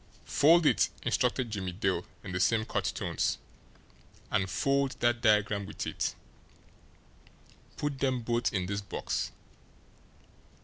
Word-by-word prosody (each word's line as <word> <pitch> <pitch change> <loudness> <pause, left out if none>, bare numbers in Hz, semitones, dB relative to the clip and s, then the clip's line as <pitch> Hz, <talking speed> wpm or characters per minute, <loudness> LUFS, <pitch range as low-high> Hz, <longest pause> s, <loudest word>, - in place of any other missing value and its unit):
"Fold 165 +3 +5
it!" - - +4
instructed 125 -1 +1
Jimmie 95 -4 -3
Dale, 95 -2 0 0.2
in 95 - -6
the 90 - -2
same 110 +3 +3
curt - - -2
tones. - - -1 0.9
"And 95 -1 +1
fold 140 +5 +1
that 120 0 +2
diagram 105 -3 +3
with - - -5
it. - - -2 1.6
Put 145 -2 -2
them 130 -2 +1
both 120 +1 +1
in 95 -3 -1
this 100 +2 -2
box. 100 - -3
115 Hz, 125 wpm, -30 LUFS, 100-130 Hz, 1.6 s, Fold